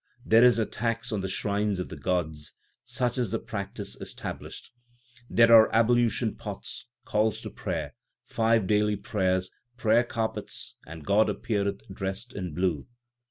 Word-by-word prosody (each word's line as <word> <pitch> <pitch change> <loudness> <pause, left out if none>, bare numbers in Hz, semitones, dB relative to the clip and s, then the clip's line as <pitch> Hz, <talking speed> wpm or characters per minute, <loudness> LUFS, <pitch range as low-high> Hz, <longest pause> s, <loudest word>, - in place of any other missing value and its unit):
There 115 +2 +6
is 125 -1 +6
a 110 - +2
tax 115 +1 -2
on 105 -3 -1
the 95 - -2
shrines 100 0 0
of 90 - -4
the - - -7
gods; 80 -5 -2 0.3
such 125 0 -1
is 120 -4 0
the - - 0
practice - - -5
established. - - -7 0.6
There 115 0 +5
are 110 -1 +9
ablution 115 0 +3
pots, 105 +3 -6 0.2
calls 110 -3 +1
to - - -7
prayer, - - -4 0.3
five 115 -2 +2
daily 105 +1 +2
prayers, 95 -4 -1 0.3
prayer 115 0 +4
carpets, 115 -2 -4
and 80 -1 -9
God 105 +2 +4
appeareth 100 -2 -2
dressed 95 +6 -4
in 90 -5 -5
blue. 90 -6 0
105 Hz, 150 wpm, -27 LUFS, 95-115 Hz, 0.6 s, are